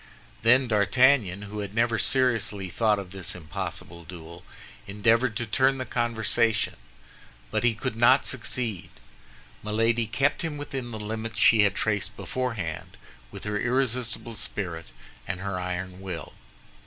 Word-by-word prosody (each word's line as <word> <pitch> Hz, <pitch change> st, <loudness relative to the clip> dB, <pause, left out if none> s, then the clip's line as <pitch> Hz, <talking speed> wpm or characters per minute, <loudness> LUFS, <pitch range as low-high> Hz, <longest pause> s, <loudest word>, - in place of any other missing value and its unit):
Then 125 Hz, +3 st, +5 dB
D'Artagnan, 105 Hz, -2 st, +3 dB
who 105 Hz, +1 st, -6 dB
had 100 Hz, 0 st, -5 dB
never 115 Hz, -1 st, +2 dB
seriously 115 Hz, -7 st, +1 dB
thought 110 Hz, 0 st, +2 dB
of 95 Hz, -3 st, -7 dB
this 95 Hz, -2 st, -3 dB
impossible 85 Hz, +1 st, -6 dB
duel, 85 Hz, 0 st, -11 dB, 0.4 s
endeavored 115 Hz, +4 st, +2 dB
to 120 Hz, -, -1 dB
turn 130 Hz, +5 st, +2 dB
the 130 Hz, -, -3 dB
conversation; 115 Hz, -1 st, +1 dB, 0.8 s
but -, -, 0 dB
he 120 Hz, -2 st, +3 dB
could 115 Hz, +1 st, -3 dB
not 120 Hz, +4 st, +5 dB
succeed. 120 Hz, -5 st, -2 dB, 0.7 s
Milady 115 Hz, +2 st, +1 dB
kept 135 Hz, +6 st, +1 dB
him 160 Hz, -3 st, -3 dB
within 135 Hz, -4 st, -5 dB
the 110 Hz, -, -6 dB
limits 110 Hz, +1 st, -5 dB
she 110 Hz, 0 st, +7 dB
had 100 Hz, -2 st, +3 dB
traced 105 Hz, -1 st, -1 dB
beforehand 115 Hz, -11 st, -4 dB, 0.3 s
with -, -, -9 dB
her 105 Hz, 0 st, -2 dB
irresistible 125 Hz, -1 st, -1 dB
spirit 85 Hz, -7 st, -4 dB, 0.4 s
and 95 Hz, -2 st, -3 dB
her 100 Hz, -2 st, -3 dB
iron 90 Hz, +1 st, -4 dB
will. 90 Hz, -4 st, -6 dB
110 Hz, 140 wpm, -26 LUFS, 100-120 Hz, 0.8 s, she